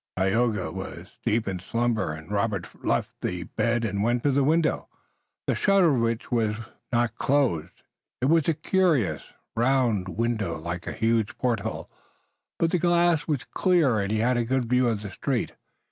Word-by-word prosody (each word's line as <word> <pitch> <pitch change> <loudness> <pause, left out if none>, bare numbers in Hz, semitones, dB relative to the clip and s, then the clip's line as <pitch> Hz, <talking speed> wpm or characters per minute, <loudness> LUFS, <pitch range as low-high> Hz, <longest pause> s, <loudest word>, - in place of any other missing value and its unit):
Tayoga 105 +1 +1
was - - -8
deep 110 0 +1
in 95 -2 -2
slumber, 115 -2 -1
and 80 +4 -9
Robert 100 -3 0
finally - - -7
left - - +1
the 90 -1 -2
bed 115 +4 0
and 100 -2 -1
went 120 +2 +1
to 145 - +3
the 140 +1 +2
window, 160 +3 +1 0.6
the - - +1
shutter 195 -6 +4
of 125 - +1
which 115 +1 -1
was 110 -3 +1 0.4
not 120 -2 +1
closed. 130 - 0 0.4
It 125 - 0
was 160 +1 +3
a 165 - +2
curious, 155 - +1 0.3
round 120 -6 +2
window, 110 -4 -1
like 85 +2 -5
a - - -2
huge 110 -1 0
porthole, 110 -3 -2 0.7
but 165 -1 +1
the 180 - +2
glass 175 -2 +3
was 145 -5 -1
clear 165 - +2
and 100 0 -1
he 110 - +1
had 120 +3 +2
a 120 - +2
good 130 +1 0
view 125 +1 +2
of 110 -3 -1
the 100 - -6
street. 125 +4 -2
115 Hz, 175 wpm, -26 LUFS, 105-135 Hz, 0.7 s, shutter